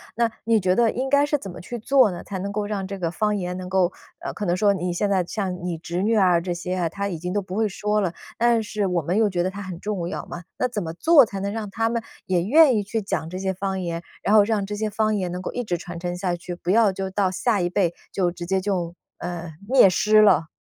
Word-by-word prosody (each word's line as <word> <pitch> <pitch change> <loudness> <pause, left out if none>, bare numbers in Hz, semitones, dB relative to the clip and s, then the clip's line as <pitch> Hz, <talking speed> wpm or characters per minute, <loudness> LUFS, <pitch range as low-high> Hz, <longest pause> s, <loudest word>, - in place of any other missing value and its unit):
那 235 -1 +1
你 225 0 +3
觉 185 -1 +2
得 230 0 +3
应 265 +2 -2
该 285 +1 +4
是 295 - 0
怎 210 -9 -4
么 175 - -10
去 240 +6 -6
做 255 -2 +4
呢， 175 - -7
才 195 - -5
能 200 +2 -4
够 205 0 -2
让 200 -2 -3
这 195 0 -6
个 170 - -1
方 210 +4 0
言 180 -2 -3
能 185 0 -6
够 185 -1 +2 0.4
可 210 - -3
能 175 -1 +1
说 205 +2 +3
你 180 -1 -2
现 200 +4 0
在 190 -2 +2
像 185 -2 -4
你 175 -2 -2
侄 175 +2 -3
女 225 +2 +2
啊 185 -5 +4
这 175 +1 -3
些 180 +1 -3
啊， 175 -2 0
她 200 +4 -3
已 180 -4 -4
经 180 +3 -4
都 205 - +1
不 185 -1 -7
会 220 +1 +2
说 210 +1 -1
了， 180 -4 -1 0.2
但 235 -1 +3
是 210 -1 -2
我 180 -2 0
们 175 +6 -1
又 220 -1 +4
觉 180 -3 -1
得 185 - 0
它 200 - -8
很 185 -3 -7
重 195 -4 -3
要 185 - -4
嘛。 175 0 -7 0.2
那 255 - +2
怎 220 -5 -4
么 160 -1 -5
做 295 - +6
才 200 -2 -6
能 200 +1 -2
让 220 0 -4
他 225 +2 0
们 235 -1 -2 0.2
也 180 -2 +1
愿 280 - +6
意 205 - 0
去 220 +3 -2
讲 195 -5 -3
这 185 - -5
些 190 0 -1
方 190 0 -3
言， 170 -1 -4 0.2
然 210 - +2
后 210 - +8
让 210 -1 0
这 210 - -4
些 215 0 -2
方 215 +1 +1
言 185 -3 -2
能 180 +1 -4
够 - - -4
一 245 - -2
直 185 -6 -1
传 175 0 -7
承 175 0 -3
下 180 -1 -1
去， 175 +1 -7
不 175 0 -6
要 215 +1 +5
就 190 0 -4
到 190 -1 0
下 205 +1 +1
一 175 - +1
辈 175 -1 0 0.2
就 185 -3 +1
直 175 0 -7
接 190 +1 0
就， 180 -4 -2 0.2
呃， 175 -2 -6
灭 250 -5 +6
失 215 +3 +4
了。 180 -6 +4
195 Hz, 305 characters per minute, -23 LUFS, 180-215 Hz, 0.4 s, 后